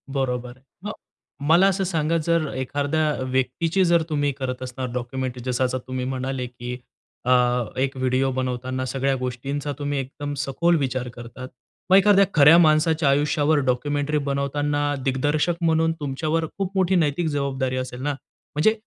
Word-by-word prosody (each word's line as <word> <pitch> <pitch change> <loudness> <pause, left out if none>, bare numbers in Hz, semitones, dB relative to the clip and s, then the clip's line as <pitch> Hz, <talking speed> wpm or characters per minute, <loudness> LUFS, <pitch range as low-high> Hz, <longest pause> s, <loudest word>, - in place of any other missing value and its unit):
बरोबर. 125 -2 -2 0.3
मग 210 - -2 0.6
मला 180 +4 +6
असं 195 0 +1
सांगा, 165 -2 0
जर 165 0 +1
एखाद्या 145 +4 0 0.2
व्यक्तीची 160 +8 +1
जर 170 -1 +4
तुम्ही 145 -2 +1
करत 130 -1 -4
असणार 130 0 -5
डॉक्युमेंटरी 125 0 -4
जसं 125 0 +1
असं 130 0 -1
तुम्ही 130 -1 -3
म्हणाले 130 0 -3
की 125 0 -7 0.5
अ, - - -1 0.5
एक 135 +1 0
व्हिडिओ 130 +1 +1
बनवताना 130 0 -2
सगळ्या 135 +1 0
गोष्टींचा 135 +3 -3
तुम्ही 145 -1 -1
एकदम 145 +2 -5
सखोल 145 +5 +1
विचार 130 -3 -2
करतात, 120 +2 -9 0.4
मग 185 - +7
एखाद्या 200 0 +6
खऱ्या 150 +2 +8
माणसाच्या 155 -2 +4
आयुष्यावर 145 +2 +2
डॉक्युमेंटरी 145 +4 0
बनवताना 145 +1 0 0.2
दिग्दर्शक 145 +6 +1
म्हणून 165 0 +2
तुमच्यावर 155 +3 -1
खूप 195 -2 -2
मोठी 190 0 +2
नैतिक 160 0 +1
जबाबदारी 135 -3 -1
असेल 130 -1 -5
ना? 145 - 0 0.4
म्हणजे 190 +9 +4
140 Hz, 145 wpm, -23 LUFS, 130-155 Hz, 0.6 s, खऱ्या